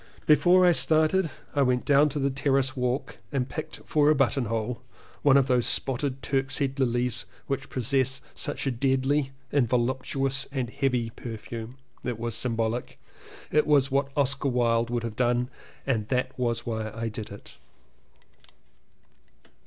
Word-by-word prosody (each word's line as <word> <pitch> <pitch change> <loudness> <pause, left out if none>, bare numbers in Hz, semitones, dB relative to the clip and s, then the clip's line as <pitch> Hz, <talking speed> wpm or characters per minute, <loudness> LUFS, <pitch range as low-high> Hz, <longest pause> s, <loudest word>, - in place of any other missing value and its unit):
Before 180 +4 +5
I 175 - +6
started 160 +2 +2 0.2
I 145 - +2
went 125 -2 +1
down 145 +1 +5
to 145 - -5
the 140 -1 +1
terrace 135 0 +1
walk 125 0 -2
and 130 -2 -1
picked 155 +3 -7
for 150 -1 +3
a 155 - +5
buttonhole 120 -4 0 0.4
one 140 -1 +5
of 135 - +4
those 125 -2 +2
spotted 135 0 0
Turkshead 135 +2 -1
lilies, 120 -1 0 0.2
which 135 - -3
possess 130 +1 +1
such 145 - -3
a 135 - +1
deadly 135 +3 +1 0.2
and 135 -5 +2
voluptuous 130 +2 0
and 130 -4 -3
heavy 125 -4 0
perfume. 115 +1 -8 0.3
It 120 -2 -3
was 115 0 -3
symbolic: 115 0 -1 0.5
it 150 - +3
was 140 -2 +4
what 140 0 +1
Oscar 140 0 +2
Wilde 115 -2 +1
would 120 -1 -2
have 115 -2 -4
done 125 +1 +1 0.3
and 115 -6 0
that 125 +1 0
was 120 -2 -1
why 110 -2 -3
I 115 +2 -4
did 110 -1 -6
it. 100 - -12
130 Hz, 150 wpm, -27 LUFS, 120-140 Hz, 0.5 s, I